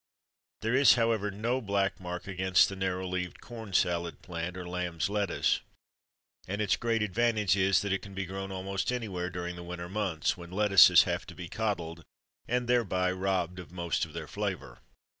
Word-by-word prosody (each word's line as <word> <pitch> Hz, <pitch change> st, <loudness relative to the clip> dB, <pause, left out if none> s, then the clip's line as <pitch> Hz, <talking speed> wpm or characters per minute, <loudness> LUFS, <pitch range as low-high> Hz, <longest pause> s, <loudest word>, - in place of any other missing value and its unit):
There 115 Hz, +2 st, 0 dB
is, 135 Hz, +1 st, +7 dB
however, 115 Hz, -3 st, +1 dB
no 115 Hz, +6 st, -1 dB
black 100 Hz, -2 st, 0 dB
mark 90 Hz, -1 st, -6 dB
against 95 Hz, -1 st, +3 dB
the 100 Hz, -, -6 dB
narrow 95 Hz, -1 st, -2 dB
leaved 90 Hz, -1 st, -3 dB
CORN 115 Hz, -4 st, -9 dB
SALAD 85 Hz, -2 st, 0 dB
plant, 90 Hz, 0 st, -5 dB
or 90 Hz, -1 st, -6 dB
"lamb's 90 Hz, 0 st, -2 dB
lettuce"; 105 Hz, -1 st, +1 dB, 0.9 s
and 100 Hz, +3 st, -3 dB
its 105 Hz, -3 st, +2 dB
great 115 Hz, -2 st, 0 dB
advantage 105 Hz, -1 st, +2 dB
is 95 Hz, 0 st, +3 dB
that 100 Hz, -2 st, 0 dB
it 100 Hz, -, -1 dB
can 100 Hz, -1 st, -11 dB
be 95 Hz, 0 st, -2 dB
grown 95 Hz, +1 st, -5 dB
almost 95 Hz, +3 st, -2 dB
anywhere 100 Hz, -8 st, -3 dB
during 90 Hz, -1 st, -5 dB
the 85 Hz, -, -8 dB
winter 85 Hz, 0 st, -6 dB
months, 95 Hz, -5 st, -1 dB
when 85 Hz, -1 st, -10 dB
lettuces 95 Hz, -1 st, +7 dB
have -, -, -3 dB
to -, -, -10 dB
be 90 Hz, -1 st, -7 dB
"coddled," 85 Hz, -6 st, -3 dB, 0.4 s
and 125 Hz, 0 st, 0 dB
thereby 95 Hz, -7 st, +2 dB
robbed 90 Hz, -1 st, -1 dB
of 90 Hz, -2 st, -10 dB
most 85 Hz, -2 st, -1 dB
of -, -, -5 dB
their -, -, -6 dB
flavour. -, -, -4 dB
95 Hz, 180 wpm, -30 LUFS, 90-105 Hz, 0.9 s, is